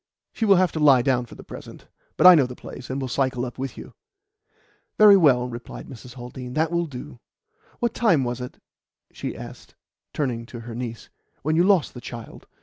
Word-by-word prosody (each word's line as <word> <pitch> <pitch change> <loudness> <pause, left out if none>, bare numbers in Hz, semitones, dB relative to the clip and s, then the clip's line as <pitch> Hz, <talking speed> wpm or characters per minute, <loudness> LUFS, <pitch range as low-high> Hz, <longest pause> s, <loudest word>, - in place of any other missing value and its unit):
"She 225 - -1
will 200 -2 +6
have 185 -1 +3
to 160 - -4
lie 140 -5 +6
down 125 -2 +1
for - - -12
the - - -12
present. - - -11 0.3
But - - +3
I 185 - +12
know 145 -7 +4
the 125 - -9
place, 125 - -10
and 135 +1 -3
will 135 - -3
cycle 130 0 -1
up 125 +1 -8
with 135 -1 -5
you." - - -10 1.0
"Very 210 -1 +8
well," 135 -9 +4
replied 120 -1 -8
Mrs. 125 0 -11
Haldean, 125 0 -8
"that 160 +1 +1
will 170 0 0
do. 130 -2 -9 0.6
What 235 -1 -1
time 175 - +3
was 120 0 -3
it," 125 - -7 0.6
she - - -5
asked, - - -11 0.4
turning 120 -6 -3
to 120 -2 -9
her 115 0 -8
niece, 115 -1 -6 0.3
"when 155 +2 +1
you 170 - +4
lost 190 -4 +3
the 125 - -9
child? 120 -2 -10
130 Hz, 205 wpm, -24 LUFS, 125-160 Hz, 1.0 s, I